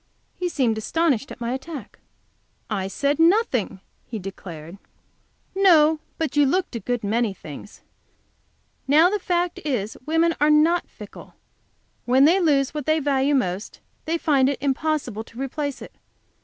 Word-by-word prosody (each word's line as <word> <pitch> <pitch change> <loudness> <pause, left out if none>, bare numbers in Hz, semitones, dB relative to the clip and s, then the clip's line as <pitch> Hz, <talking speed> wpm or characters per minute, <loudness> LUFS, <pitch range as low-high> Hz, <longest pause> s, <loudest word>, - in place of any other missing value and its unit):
He 360 0 -2
seemed 235 -9 0
astonished 275 0 0
at - - -9
my 235 +1 -2
attack. 270 -1 -8 0.7
"I 195 -3 -1
said 280 +9 -1
nothing," 330 - +2 0.2
he 230 - -7
declared. 180 -3 -9 0.7
"No, 320 -5 +5 0.2
but 315 -4 -2
you 290 - +5
looked 360 -1 -1
a - - -2
good 240 +2 -3
many 215 0 0
things. 155 +5 -11 1.1
Now 315 +6 +5
the 420 - 0
fact 355 -1 -1
is, 240 -8 -2
women 325 +1 +2
are 295 - +4
not 315 +3 +3
fickle. - - -12 0.7
When 260 +3 +5
they 345 +5 +5
lose 285 -6 +2
what 300 -2 -5
they 310 0 +3
value 280 0 +1
most, 190 -5 -2 0.3
they 330 +2 0
find 275 -5 +2
it 280 - -2
impossible 275 -5 -1
to 230 +2 -14
replace 280 +1 -4
it. - - -12
280 Hz, 150 wpm, -23 LUFS, 230-320 Hz, 1.1 s, No